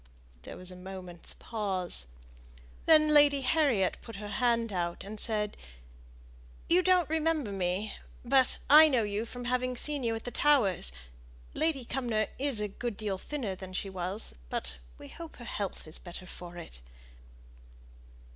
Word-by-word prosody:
There - - -9
was 185 0 -5
a - - -9
moment's 180 -2 -7
pause. 190 - 0 0.8
Then 310 -1 +6
Lady 290 -2 +6
Harriet 265 - +2
put 230 - -10
her 205 +1 -6
hand 230 -2 +1
out, 175 -1 -2
and 210 +2 -8
said, 210 -2 0 1.1
"You 355 +2 +5
don't 365 -3 +4
remember 315 -6 0
me, 190 +2 -1 0.3
but 260 +1 +4
I 310 +3 +9
know 250 -5 +2
you 205 +2 -2
from 245 +1 -7
having 250 0 0
seen 290 0 -1
you 230 -1 0
at 225 - -6
the 245 - -5
Towers. 240 - +3 0.6
Lady 310 -6 0
Cumnor 235 -4 -1
is 275 -5 +1
a 210 - 0
good 220 +1 -5
deal 200 -3 -3
thinner 255 -8 -3
than 185 0 -9
she 195 +1 -3
was, 190 +3 -2 0.2
but - - -3 0.2
we - - -11
hope 330 -1 -10
her 240 - -10
health 200 -4 -4
is 155 - -6
better 175 +1 -9
for 175 -1 -9
it." 165 - -9
225 Hz, 155 wpm, -30 LUFS, 190-275 Hz, 1.1 s, I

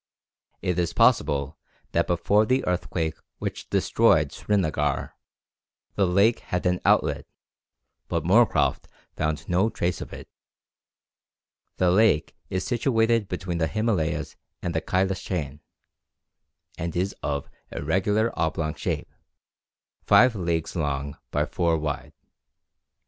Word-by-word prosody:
It 90 -1 0
is 85 -1 0
possible 75 - +2 0.3
that - - +1
before 100 +5 +2
the 130 +3 +1
earthquake 85 -2 -2 0.2
which - - -5
destroyed - - +3
Srinagar, 80 -8 -1 0.8
the 100 -2 +2
lake 100 +6 +3
had 90 0 -3
an 90 0 +2
outlet, - - +2 0.8
but - - -1
Moorcroft - - +3 0.3
found 75 0 -2
no 95 +5 +2
trace 90 -5 -2
of - - -7
it. - - -9 1.5
The 90 -1 +3
lake 95 -6 +3
is 95 0 -2
situated 115 -3 +2
between 90 -1 -3
the 80 - +2
Himalayas 105 -7 -1 0.2
and 85 - -3
the 80 - 0
Cailas 95 +1 0
chain, 75 -6 -4 1.2
and 85 0 -3
is 95 +3 0
of 70 -1 -2 0.2
irregular 105 +9 0
oblong 80 -1 -1
shape, - - -4 0.9
five 115 +5 +5
leagues 85 -4 -2
long 70 -3 -2
by 75 +1 0
four 85 0 0
wide. 75 -2 -4
90 Hz, 115 wpm, -25 LUFS, 80-100 Hz, 1.5 s, five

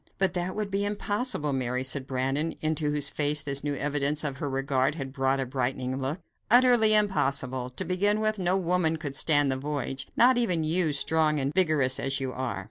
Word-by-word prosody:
"But 190 -2 +1
that 180 0 -3
would 210 -2 -4
be 200 +1 -1
impossible, 205 - -2
Mary," 125 -1 -2
said 130 0 -3
Brandon, 135 +5 -2
into 155 -1 -1
whose 145 -1 0
face 150 0 +1
this 140 -2 -4
new 145 -1 -2
evidence 145 +1 -1
of 140 -3 -3
her 140 - -4
regard 135 +1 -1
had 135 -4 -7
brought 135 0 0
a 135 - -1
brightening 130 0 -3
look; 135 +5 -2 0.3
"utterly 240 -2 +6
impossible. 135 -11 +2
To 125 - -6
begin 205 +4 +1
with, 215 -1 0
no 185 +1 +1
woman 175 -3 0
could 150 -3 -6
stand 145 -1 +3
the 130 - -1
voyage; 135 -1 -4
not 245 +1 +5
even 180 -9 0
you, 160 +1 +1
strong 155 +1 +1
and 135 +2 -2
vigorous 155 -8 +2
as 135 0 -2
you 130 -1 -4
are." 130 -6 -4
150 Hz, 200 wpm, -26 LUFS, 135-180 Hz, 0.3 s, utterly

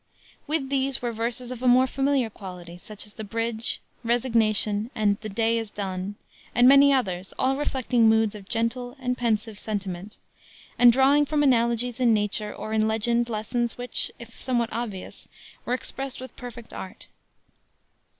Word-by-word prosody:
With 295 -3 0
these 275 -1 +1
were 240 - 0
verses 235 +2 -3
of 250 -1 -6
a 255 - +1
more 250 +1 +6
familiar 270 -3 0
quality, 180 -3 -9
such 210 +2 -4
as 210 - -8
the 220 - -7
Bridge, 230 +1 -2 0.2
Resignation, 225 -3 +2
and 205 -2 +1
the 215 - -6
Day 225 +3 +1
Is 225 -2 -5
Done, 195 -1 -4 0.4
and 245 +2 +6
many 280 +1 +8
others, 190 -9 -1
all 265 +1 +2
reflecting 255 -5 +2
moods 220 -1 +3
of 205 -2 -11
gentle 245 +3 -2
and 250 -1 -1
pensive 220 -3 -1
sentiment, 200 -1 -4 0.6
and 245 0 +9
drawing 275 +4 +4
from 295 0 +1
analogies 235 -2 +2
in 235 -3 +4
nature 210 0 -1
or 215 - -6
in 220 0 +2
legend 235 +2 +1
lessons 230 +2 -2
which, 245 0 -2
if 235 -1 -12
somewhat 240 -2 0
obvious, 220 -5 -5 0.4
were 245 - -1
expressed 270 +1 -5
with 260 -2 -9
perfect 240 -2 -10
art. 190 - -8
230 Hz, 160 wpm, -25 LUFS, 215-250 Hz, 0.6 s, and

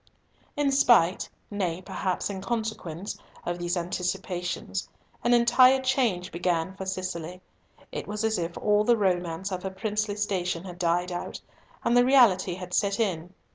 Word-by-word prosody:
In 290 -1 +2
spite—nay, 190 -6 +2
perhaps, 185 +2 -2
in 190 -1 -5
consequence—of 195 -5 -5
these 175 +1 -1
anticipations, 180 +1 -3 0.3
an 240 - +2
entire 255 +2 +6
change 235 -9 0
began 175 +1 -1
for 190 -1 -6
Cicely. 185 -2 -4 0.5
It - - -5
was 210 +1 -3
as 220 -3 +1
if 170 0 -3
all 210 0 +3
the 235 +2 +4
romance 180 -1 0
of 185 -1 -3
her 190 - -3
princely 210 +1 -2
station 185 -4 -1
had 180 -2 -9
died 175 +1 +1
out 175 - -5 0.4
and 240 - +2
the 245 - +7
reality 225 -9 +5
had 180 -1 -8
set 200 +1 +1
in. 180 -4 -1
190 Hz, 145 wpm, -27 LUFS, 175-215 Hz, 0.5 s, the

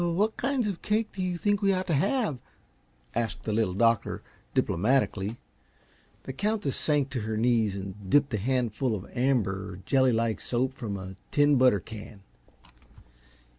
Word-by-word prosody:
"What 180 +6 +1
kinds 265 -2 0
of 200 -4 -3
cake 215 +1 0
do 190 - -4
you 180 -1 -1
think 205 +2 +1
we 200 -1 +4
ought 185 0 -1
to 170 - -1
have?" 195 - +1 0.7
asked 115 -2 -2
the 110 - -2
Little 105 -4 +1
Doctor, 115 +2 +2 0.3
diplomatically. 110 0 +1 0.9
The 130 - -6
Countess 205 -2 -1
sank 145 -3 0
to 130 - -2
her 110 0 -3
knees 115 -3 +2
and 95 0 -7
dipped 145 0 +3
a - - +2
handful 120 +1 0
of 100 -1 -6
amber, 100 -8 0
jelly 130 -2 +4
like 115 -1 0
soap 130 +2 -1
from 110 -7 -4
a 95 0 -8
tin 145 0 +4
butter 125 -5 +5
can. 105 0 -10
125 Hz, 160 wpm, -28 LUFS, 105-165 Hz, 0.9 s, butter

